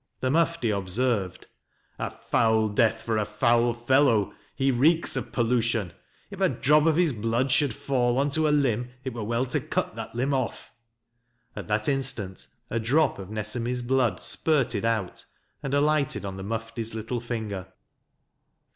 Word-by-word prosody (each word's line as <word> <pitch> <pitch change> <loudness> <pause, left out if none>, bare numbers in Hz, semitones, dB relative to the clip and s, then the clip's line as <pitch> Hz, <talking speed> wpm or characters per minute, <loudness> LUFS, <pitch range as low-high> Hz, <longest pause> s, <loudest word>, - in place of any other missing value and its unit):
The 130 - 0
Mufti 165 -6 +1
observed: 100 0 -1 0.3
" - - -40
A - - -2
foul 110 -1 +1
death 110 +1 +1
for 115 -1 -1
a - - +1
foul 115 +3 +2
fellow; 120 -3 +2 0.2
he 135 0 +2
reeks 155 +7 +3
of - - -4
pollution. 115 -6 0 0.4
If - - -8
a - - +4
drop 150 +3 +3
of 160 - +3
his 170 -4 +2
blood 115 +4 0
should 140 0 +3
fall 125 -2 0
on 140 +1 +1
to 155 +1 +2
a - - +2
limb 125 -5 +1
it 130 -2 -4
were 115 -2 -5
well 115 +4 0
to 130 - -1
cut - - -3
that - - -7
limb 130 +4 0
off." 130 -3 -3 0.8
At 100 -5 -7
that 105 0 0
instant 130 -9 -1 0.2
a 115 - 0
drop 135 +3 +2
of 95 -1 -8
Nesemi's 115 +3 -2
blood 120 -6 +1
spurted 125 -9 +1
out 110 -5 -2 0.4
and 135 - -4
alighted 145 -4 +1
on 95 -1 -5
the 95 - -7
Mufti's 115 +1 -4
little 110 +2 -3
finger. 110 -6 -4
120 Hz, 165 wpm, -26 LUFS, 110-135 Hz, 0.8 s, a